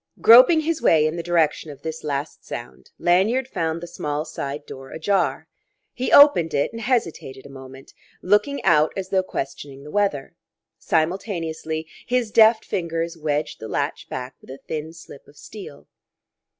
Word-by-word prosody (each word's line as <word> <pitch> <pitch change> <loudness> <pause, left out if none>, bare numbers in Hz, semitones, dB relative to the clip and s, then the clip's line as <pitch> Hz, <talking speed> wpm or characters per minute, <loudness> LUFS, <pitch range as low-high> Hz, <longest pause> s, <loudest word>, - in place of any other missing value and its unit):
Groping 255 +8 +7
his 320 0 -2
way 155 -2 +4
in 155 +1 -1
the 170 - -3
direction 165 -2 0
of 145 - -12
this 160 0 -6
last 145 0 -4
sound, 120 0 -9
Lanyard 210 +9 +2
found 165 -8 -3
the 175 - -7
small 150 -1 -4
side 145 0 -6
door 135 0 -10
ajar. 160 -3 -1 0.5
He 255 - -3
opened 175 - +6
it, 140 - 0
and 230 - -7
hesitated 170 - -2
a - - -11
moment, 135 0 -12 0.3
looking 210 +9 +1
out 155 -4 +4
as 190 -1 -4
though 190 -1 +2
questioning 140 -4 -6
the 150 - -10
weather; 200 -9 -1 0.5
simultaneously 160 -2 -2 0.2
his 245 -3 0
deft 220 0 +5
fingers 165 -1 -3
wedged 150 -1 -3
the 110 - -7
latch - - -3
back 125 0 -6
with - - -19
a 135 - -8
thin 155 0 -4
slip 165 -4 -14
of 145 - -20
steel. 195 -9 -11
160 Hz, 165 wpm, -22 LUFS, 145-200 Hz, 0.5 s, Groping